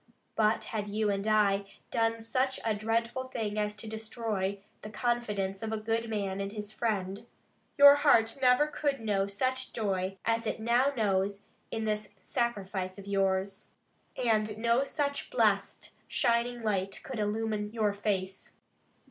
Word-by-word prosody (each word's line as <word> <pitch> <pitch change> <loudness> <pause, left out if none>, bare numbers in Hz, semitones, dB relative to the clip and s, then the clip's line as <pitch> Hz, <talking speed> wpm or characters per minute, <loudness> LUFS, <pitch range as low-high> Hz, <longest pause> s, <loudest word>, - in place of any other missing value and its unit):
But 215 0 +2
had 210 -2 -4
you 210 0 +1
and 200 +1 -2
I 205 -2 +3 0.3
done 225 0 +1
such 260 +3 0
a 225 - +2
dreadful 230 +4 -1
thing 215 -4 -3
as 210 0 -1
to 215 +1 -8
destroy 220 -3 -3 0.2
the 210 - -7
confidence 210 -4 -1
of 220 -1 -3
a 220 - -1
good 225 +1 -1
man 200 -3 -2
in 195 - -2
his 210 0 -6
friend, 210 -1 -2 0.5
your 285 0 +10
heart 235 -6 +4
never 250 +3 +5
could 290 -2 -1
know 205 -3 0
such 255 +6 -1
joy 195 -3 -1
as 230 0 +1
it - - -2
now 240 +5 +3
knows 200 -1 +1 0.3
in 225 -1 -3
this 210 -1 -2
sacrifice 195 -4 -2
of 200 - -9
yours; 195 0 0 0.5
and 215 -3 +1
no 235 +3 +3
such 285 0 -2
blessed, - - +1 0.2
shining 240 0 +1
light 195 -3 -1
could 260 -4 -5
illumine 210 0 -1
your 215 -3 +1
face. 195 -2 -3
215 Hz, 150 wpm, -30 LUFS, 200-235 Hz, 0.5 s, your